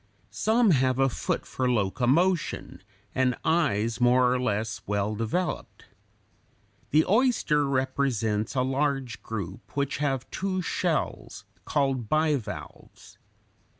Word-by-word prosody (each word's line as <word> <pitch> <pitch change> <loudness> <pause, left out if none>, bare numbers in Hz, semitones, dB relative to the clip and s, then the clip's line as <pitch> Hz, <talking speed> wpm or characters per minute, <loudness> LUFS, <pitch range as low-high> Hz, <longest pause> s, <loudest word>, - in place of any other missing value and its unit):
Some 225 -1 +3
have 130 -3 +2
a 135 0 +3
foot - - -2
for 130 -1 -1
locomotion 125 - +1 0.3
and 130 -1 +2
eyes 125 -9 +1
more 125 0 +4
or 130 - 0
less 110 -1 -2
well 100 +1 0
developed. 115 - -3 1.0
The 155 +2 +4
oyster 205 - +2
represents 130 -5 0
a 130 - +2
large 135 -2 -1
group 105 - -7
which 140 0 0
have 135 -3 -1
two 185 -1 -2
shells, - - -2 0.2
called 135 -5 0
bivalves. 155 -6 -3
130 Hz, 110 wpm, -27 LUFS, 115-150 Hz, 1.0 s, more